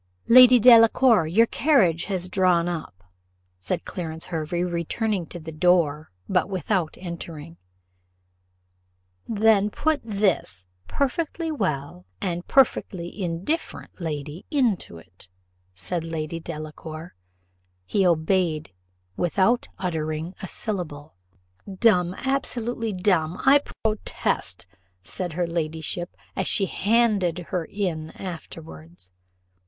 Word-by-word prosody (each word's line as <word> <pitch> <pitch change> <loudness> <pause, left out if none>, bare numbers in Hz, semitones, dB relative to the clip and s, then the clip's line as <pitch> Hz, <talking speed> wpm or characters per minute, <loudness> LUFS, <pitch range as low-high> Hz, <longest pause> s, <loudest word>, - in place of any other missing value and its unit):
"Lady 250 +1 +9
Delacour, 230 -4 +6
your 215 +8 +4
carriage 200 - +2
has 185 -3 -2
drawn 180 -2 +2
up," 155 - -5 0.6
said 90 - -3
Clarence 160 -2 -5
Hervey, 170 +1 -2
returning 180 +2 -2
to 175 - -8
the 160 0 -8
door, 155 -2 +2 0.2
but 185 +1 +1
without 185 -2 -1
entering. 170 -2 -8 1.7
"Then 215 -1 +3
put 315 +7 0
this 195 - 0 0.2
'perfectly 320 +3 -1
well' 145 - -3
and 175 -1 -3
'perfectly 200 -8 +1
indifferent' 180 - -3
lady 150 0 -5
into 240 - 0
it," 90 +2 -12 0.5
said 165 - -3
Lady 165 0 -4
Delacour. 155 +1 -8 0.7
He 195 - +1
obeyed 165 - +1 0.4
without 190 - +1
uttering 160 -1 -3
a 190 - -5
syllable. 160 -9 -5 0.6
"Dumb! 185 -3 +3
absolutely 240 -4 -2
dumb! 180 -3 +1
I 280 +2 +7 0.2
protest," 215 -1 -1 0.4
said 175 - -5
her 175 +2 0
ladyship, 165 +1 -4 0.2
as 190 - -1
he 195 - +2
handed 205 -5 +2
her 180 -3 0
in 165 -6 -3
afterwards. 90 - -9
175 Hz, 105 wpm, -24 LUFS, 160-210 Hz, 1.7 s, Lady